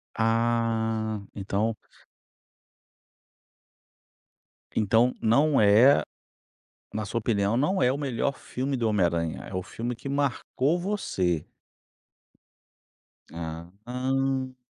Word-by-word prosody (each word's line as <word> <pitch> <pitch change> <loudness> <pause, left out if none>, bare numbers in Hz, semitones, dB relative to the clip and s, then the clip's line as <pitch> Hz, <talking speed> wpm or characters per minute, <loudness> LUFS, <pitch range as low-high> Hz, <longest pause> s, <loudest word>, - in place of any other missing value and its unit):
Ah! 115 -1 0
Então 105 +3 -1 3.0
Então 115 +4 +3
não 140 +6 +3
é 110 +7 +6 0.9
na 110 0 -3
sua 115 +4 -2
opinião, 105 -1 +1
não 150 +7 +1
é 125 +1 +4
o 140 - -3
melhor 140 0 -1
filme 135 +2 -3
do 115 -2 0
Homem 105 -4 +2
Aranha, 85 -2 -1
é 100 - -9
o 95 - -1
filme 120 +5 -4
que 130 +4 -8
marcou 140 +3 0
você. 95 - -1 1.9
Aham. 125 +11 -3
115 Hz, 95 wpm, -27 LUFS, 105-130 Hz, 3.0 s, é